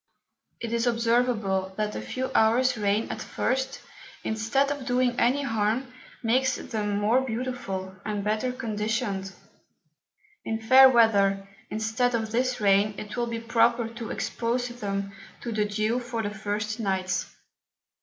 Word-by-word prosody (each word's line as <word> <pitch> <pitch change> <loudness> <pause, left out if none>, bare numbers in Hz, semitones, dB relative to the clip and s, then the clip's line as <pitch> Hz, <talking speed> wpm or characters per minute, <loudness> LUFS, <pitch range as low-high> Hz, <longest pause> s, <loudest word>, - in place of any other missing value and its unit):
It 230 -1 -4
is 235 +1 +1
observable, 230 -5 +1
that 210 -1 -1
a - - -3
few 260 0 -4
hours 245 +4 +4
Rain 210 0 0
at - - -5
first, 265 +1 -2 0.4
instead 230 +6 +1
of 285 -3 -5
doing 250 -1 +2
any 265 +4 +2
harm, 225 +1 -1 0.3
makes 255 +3 +2
them 210 -2 -2
more 220 +5 +3
beautiful, 230 -7 -4
and 210 -2 -3
better 215 +4 0
conditioned. 215 -4 -2 1.1
In 225 0 -2
fair 260 +4 +8
Weather, 200 -5 +3 0.2
instead 225 +3 0
of 220 -1 -2
this 250 +2 0
Rain, 205 0 +3
it 210 0 -7
will 240 -1 -1
be 230 -1 -3
proper 230 0 +2
to 230 -1 -7
expose 245 +1 -2
them 200 -4 -4 0.3
to 235 - -4
the 215 -1 +1
Dew 215 +3 0
for 240 -2 -4
the 205 - -2
first 210 +1 -3
Nights. 190 -3 -1
225 Hz, 145 wpm, -26 LUFS, 210-245 Hz, 1.1 s, fair